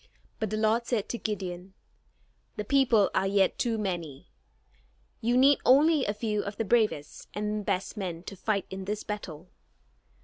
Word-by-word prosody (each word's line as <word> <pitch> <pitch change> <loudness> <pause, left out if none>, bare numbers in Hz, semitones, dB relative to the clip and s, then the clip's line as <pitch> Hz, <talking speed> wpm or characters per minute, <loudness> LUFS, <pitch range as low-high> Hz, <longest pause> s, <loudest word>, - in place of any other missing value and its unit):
But 220 -3 -1
the 215 - -2
Lord 220 +2 +1
said 225 -5 0
to 235 - -3
Gideon: 190 -3 -5 0.8
"The 210 - -4
people 240 -5 +3
are 195 - +1
yet 195 -1 +2
too 230 -2 0
many. 175 -9 -4 0.9
You 240 +2 +2
need 275 +2 +6
only 290 +2 +5
a 205 - 0
few 210 -1 -1
of 200 0 -6
the 225 - -1
bravest 210 -9 0
and 210 0 -2
best 195 0 -2
men 175 -4 -4
to 195 - -8
fight 200 0 -1
in 190 0 -6
this 210 +1 -3
battle. 180 -5 -7
210 Hz, 165 wpm, -28 LUFS, 190-225 Hz, 0.9 s, need